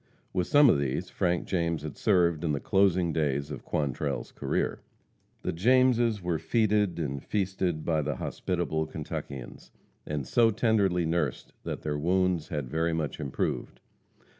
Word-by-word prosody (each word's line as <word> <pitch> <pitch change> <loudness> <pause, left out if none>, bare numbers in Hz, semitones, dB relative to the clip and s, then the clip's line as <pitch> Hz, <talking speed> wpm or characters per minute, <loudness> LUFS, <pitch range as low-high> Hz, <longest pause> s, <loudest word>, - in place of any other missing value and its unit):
With 90 -2 0
some 145 0 +6
of 95 - +5
these 70 -2 -2
Frank 90 -1 0
James 85 -4 -1
had 75 -2 -6
served 85 -6 +2
in 80 -3 +1
the 70 - -1
closing 95 -3 +2
days 70 -2 0
of 70 - -6
Quantrell's 70 -1 -2
career. - - -1 0.6
The - - -1
Jameses 120 +1 +3
were 85 -3 0
feted 105 -5 +1
and 70 -4 -3
feasted 95 -5 -1
by 80 -2 +1
the - - -2
hospitable 85 -4 -2
Kentuckians, 70 -4 -7 0.3
and 75 -3 -3
so 115 -1 +4
tenderly 100 -6 +2
nursed 80 -5 -1
that - - -4
their 75 -1 -2
wounds 90 0 +1
had 75 -7 -3
very 80 +5 0
much 80 -4 -2
improved. 70 -3 -3
85 Hz, 150 wpm, -28 LUFS, 75-95 Hz, 0.6 s, some